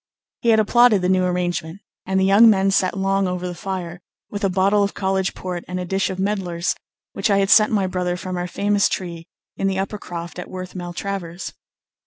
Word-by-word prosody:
He 235 - +1
had 220 -1 +5
applauded 220 -2 +4
the 180 - +2
new 185 -1 +3
arrangement, 175 -1 -2 0.3
and 190 0 +1
the 190 - +3
young 205 +4 +7
men 195 -2 +3
sat 190 0 +1
long 195 0 +1
over 180 0 -3
the 180 - -4
fire, 180 -1 -5 0.3
with 205 0 -5
a 195 - +3
bottle 195 +3 +2
of 200 0 0
college 190 -1 -1
port 180 -2 -5
and 180 0 -4
a 180 - -3
dish 195 +2 0
of 190 - -4
medlars 190 -3 -1 0.4
which - - -1
I 200 - +4
had 195 0 +2
sent 215 0 +6
my 200 -3 +2
brother 180 -1 -2
from 185 0 -5
our 175 0 -2
famous 205 +2 +1
tree 170 -3 -5 0.3
in 195 - 0
the 190 -1 -1
Upper 195 +2 -3
Croft 175 -1 -7
at 180 - -7
Worth 185 -1 -7
Maltravers. 175 0 -5
190 Hz, 215 wpm, -21 LUFS, 180-200 Hz, 0.4 s, young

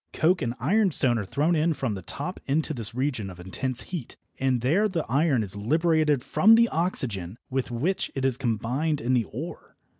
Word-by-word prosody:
Coke 180 +3 +2
and 120 -2 -2
ironstone 180 - +2
are 100 - -3
thrown 155 - +1
in 160 +1 +1
from 130 -6 -2
the 95 - -5
top 145 - -5
into 155 +3 0
this 115 -3 -4
region 125 -6 -1
of 90 -1 -11
intense 125 +8 -4
heat, 170 -10 -7 0.2
and 130 -2 +1
there 170 - +3
the 175 -6 -2
iron 140 -2 +2
is 100 -1 0
liberated 150 +4 +2
from 220 +3 +5
the 230 0 +4
oxygen 115 - -2
with 130 0 -1
which 145 +11 -1
it 135 -1 -1
is 130 -2 +2
combined 125 +5 -1
in 125 +3 0
the 120 -3 +2
ore. 150 +9 -8
135 Hz, 190 wpm, -26 LUFS, 115-160 Hz, 0.2 s, from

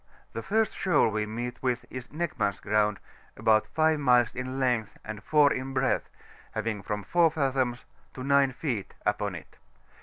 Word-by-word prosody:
— - - -33
^The 115 - -3
first 220 +1 +1
shoal 185 -10 +3
we 105 0 -1
meet 120 +3 -5
with 125 -1 -1
is 130 -1 -6
NechmcaCs 145 - -2
Ground^ 105 0 +2 0.4
about 110 -1 +3
5 160 -1 +2
miles 125 -4 +4
in 130 +1 -4
length, 120 -5 0
and 105 -1 -6
4 150 +1 +4
in 130 +1 -4
breadth, 130 0 +1 0.4
having 110 -1 -2
from 105 +1 -4
4 170 - +4
fathoms 135 -5 -1 0.3
to 130 - -6
9 140 0 +4
feet 125 -7 -4
upon - - 0
it. - - -11
125 Hz, 170 wpm, -28 LUFS, 110-140 Hz, 0.4 s, miles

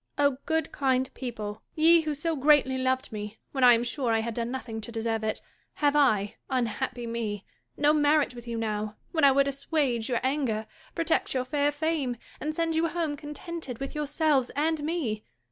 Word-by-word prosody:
O 285 -2 +2
good 320 -1 0
kind 260 -2 +1
people! 220 -4 -5
ye 330 +1 +6
who 305 -2 -2
so 325 +3 0
greatly 280 -2 +4
loved 260 0 0
me, 210 0 -6
when 265 -2 -1
I 245 -1 +9
am 230 - 0
sure 245 0 -1
I 225 0 +2
had 230 +1 -3
done 235 +1 -2
nothing 240 -3 -5
to 220 - -8
deserve 225 -1 -2
it, 215 - -1 0.3
have 290 -1 +2
I 215 -9 +3
(unhappy 245 -1 -1
me 225 -3 -3 0.2
!) - - -48
no 295 +1 +4
merit 295 -2 +3
with 240 -1 -11
you 235 -1 -3
now, 215 -1 -2 0.2
when 320 -3 0
I 280 - +8
would 275 +1 +3
assuage 275 -4 -1
your 240 - +1
anger, 260 -5 0 0.3
protect 330 -4 0
your 255 -1 0
fair 290 +2 +1
fame, 295 -5 -1 0.2
and 310 +1 -3
send 330 0 0
you 325 +1 +2
home 325 -3 -2
contented 300 -2 -7
with 275 +2 -5
yourselves 295 -3 +1
and 310 +2 +1
me 295 -10 -2
265 Hz, 195 wpm, -28 LUFS, 235-300 Hz, 0.3 s, I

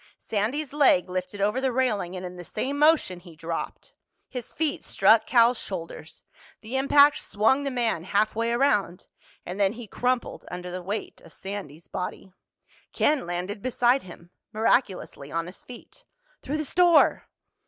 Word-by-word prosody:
Sandy's 250 +8 -2
leg 230 -11 +4
lifted 185 +2 -4
over 210 +6 +1
the 265 -1 +1
railing 215 -8 0
and 185 0 -6
in 180 0 -7
the 175 - -9
same 275 - -3
motion 300 - +3
he 175 -2 -15
dropped. 165 +1 -6 0.3
His 250 -3 -7
feet 310 -2 -1
struck 215 +3 +4
Cal's 240 -1 +4
shoulders. 165 -3 -8 0.4
The 225 +4 -6
impact 285 +2 +5
swung 225 +7 +1
the - - 0
man 235 -10 -1
halfway 215 +4 +1
around—and 205 -6 -2
then 195 0 +3
he 240 0 -8
crumpled 250 +4 -2
under 180 0 -6
the 180 +1 -5
weight 200 +5 -5
of 165 - -16
Sandy's 190 -6 -8
body. 185 +1 -6 0.6
Ken 295 - +1
landed 180 +4 -4
beside 250 +2 +2
him, 175 -1 -14 0.2
miraculously 210 - 0
on 165 0 -2
his 180 +2 -12
feet. 250 - -13 0.4
"Through 295 - -3
the 310 - -3
store!" 350 +3 +4
210 Hz, 155 wpm, -26 LUFS, 180-260 Hz, 0.6 s, impact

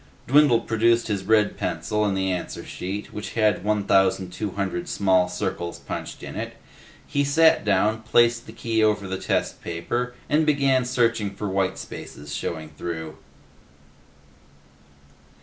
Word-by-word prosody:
Dwindle 140 -3 +5
produced 115 +1 +2
his 100 -2 -2
red 105 -1 +3
pencil 105 0 -1
and 100 -2 0
the 95 0 0
answer 90 - -4
sheet 100 +3 -5
which 105 -2 -6
had 110 -4 +2
1,200 95 -2 0
small 95 -2 +3
circles 90 -2 -3
punched - - -7
in - - -7
it. - - -5 0.5
He 145 -1 0
sat 160 +3 +4
down, 105 +2 +2
placed 120 +1 +3
the - - -8
key 115 -1 0
over 105 -2 +2
the 95 0 -3
test - - -1
paper, 120 +9 -3
and 155 +2 +3
began 140 -4 +2
searching 115 -5 +1
for 105 - -4
white 95 0 0
spaces 75 0 -8
showing 80 +1 -4
through. 80 -2 -5
105 Hz, 135 wpm, -24 LUFS, 95-120 Hz, 0.5 s, Dwindle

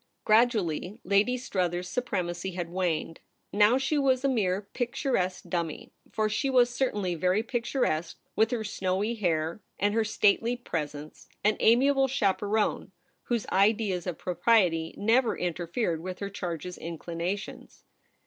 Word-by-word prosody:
Gradually 215 -4 +2
Lady 200 +6 +2
Struthers's 180 -7 -2
supremacy 185 -6 -2
had 175 -2 -4
waned; 175 -3 -2 0.3
now 210 +4 +5
she 270 +3 0
was 265 -2 +2
a - - +3
mere 205 -6 0
picturesque 240 -6 -1
dummy 170 -4 -3
— - - -29
for 215 -1 0
she 270 +6 -1
was 245 -2 +4
certainly 205 -9 -1
very 185 +5 +1
picturesque 230 - -1 0.2
with 220 0 +3
her 240 -3 -2
snowy 195 +2 -1
hair 170 -4 -1 0.2
and 205 +2 +1
her 225 0 +2
stately 220 +2 +2
presence 155 -10 -6
— - - -46
an 210 +1 +3
amiable 270 +4 +4
chaperone 210 -4 0 0.3
whose 235 -3 -1
ideas 195 -3 +2
of 175 - -3
propriety 180 -4 +2
never 230 +3 +2
in 175 -1 -1
terfered 170 +1 -2
with 185 +2 -6
her 200 -1 -5
charge's 180 -2 -5
inclinations. 170 +3 -5
200 Hz, 140 wpm, -28 LUFS, 175-235 Hz, 0.3 s, now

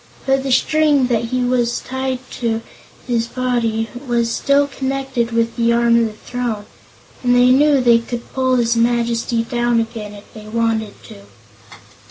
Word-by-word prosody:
But 270 0 +2
the 270 0 -3
string 295 +1 +3
that 230 -1 -1
was 245 -1 0
tied 260 0 -3 0.2
to 230 -2 -1 0.4
his 235 -2 0
body 235 -3 -1 0.2
was 235 -1 0
still 280 +4 +2
connected 265 -3 -3
with 230 0 0
the 235 -1 +2
arm 235 0 +3
of 230 - +2
the 215 - -8
throne, 230 -2 -4 0.6
and 245 -1 +2
they 250 +1 +5
knew 285 +1 +4
they 240 -2 +5
could 235 +1 -7
pull 260 -1 +1
his 235 -1 +2
Majesty 235 0 +1
down 240 0 0
again, 225 -2 -5
if 205 - -13
they 215 -1 -11
wanted 225 -1 -1
to. 220 - -12
235 Hz, 160 wpm, -18 LUFS, 230-255 Hz, 0.6 s, they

